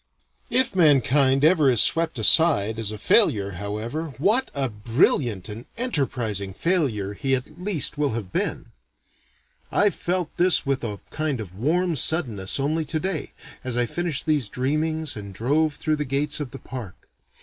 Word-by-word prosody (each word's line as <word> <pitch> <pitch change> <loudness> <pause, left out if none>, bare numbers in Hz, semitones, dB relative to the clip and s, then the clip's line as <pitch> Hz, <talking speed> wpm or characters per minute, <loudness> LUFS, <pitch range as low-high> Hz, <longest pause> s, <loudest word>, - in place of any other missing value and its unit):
If 255 -6 +2
mankind 140 -4 +4
ever 155 -4 +4
is 120 -4 +2
swept 165 +2 +3
aside 110 -4 +4
as 110 -2 0
a 110 - -6
failure 100 -1 +3
however, 110 - -5
what 215 - +2
a 135 -1 0
brilliant 115 -1 0
and 110 +3 -9
enterprising 120 - -2
failure 130 - -1
he 135 +5 0
at 130 +6 -7
least 180 -6 0
will 145 -5 +1
have 105 -5 -6
been. - - -3 1.0
I 205 0 +3
felt 180 -3 -3
this 180 -2 +4
with 135 -2 -1
a 105 -3 -3
kind 155 -4 -2
of 95 -5 -7
warm 165 - 0
suddenness 120 - 0
only 155 +4 0
today, 160 +2 -3 0.3
as 125 -2 -2
I 120 - +2
finished 165 +2 -2
these 150 -8 +1
dreamings 155 +4 -1
and 100 -2 -8
drove 150 +7 +1
through 155 -1 -1
the 150 - -1
gates 145 +3 0
of 145 -4 -4
the 135 - -9
park. 125 -9 -9
135 Hz, 160 wpm, -24 LUFS, 110-160 Hz, 1.0 s, mankind